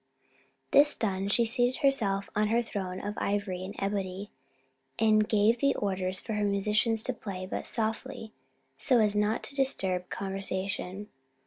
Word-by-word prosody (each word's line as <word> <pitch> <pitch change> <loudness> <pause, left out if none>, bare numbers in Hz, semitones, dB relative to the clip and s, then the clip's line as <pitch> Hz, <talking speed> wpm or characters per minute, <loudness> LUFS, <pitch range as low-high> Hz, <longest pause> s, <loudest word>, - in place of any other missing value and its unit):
This 290 +1 +5
done, 195 -3 -1
she 230 +3 +3
seated 245 +4 +1
herself 205 -8 +3
on 210 0 +2
her 230 +2 +2
throne 190 -5 -4
of 205 +1 -4
ivory 200 -3 -2
and 190 +2 -7
ebony, 195 0 -3 0.7
and 215 -1 +3
gave 215 +2 +3 0.2
orders 185 -2 -1
for 220 - -5
her 210 0 0
musicians 210 +3 +1
to 255 - 0
play, 195 -5 -6
but 185 - -5
softly, 220 0 -2 0.5
so 255 -5 +4
as 210 -2 +2
not 210 +2 +1
to 280 - -8
disturb 190 -10 0
conversation. 195 0 -4
205 Hz, 145 wpm, -29 LUFS, 195-225 Hz, 0.7 s, This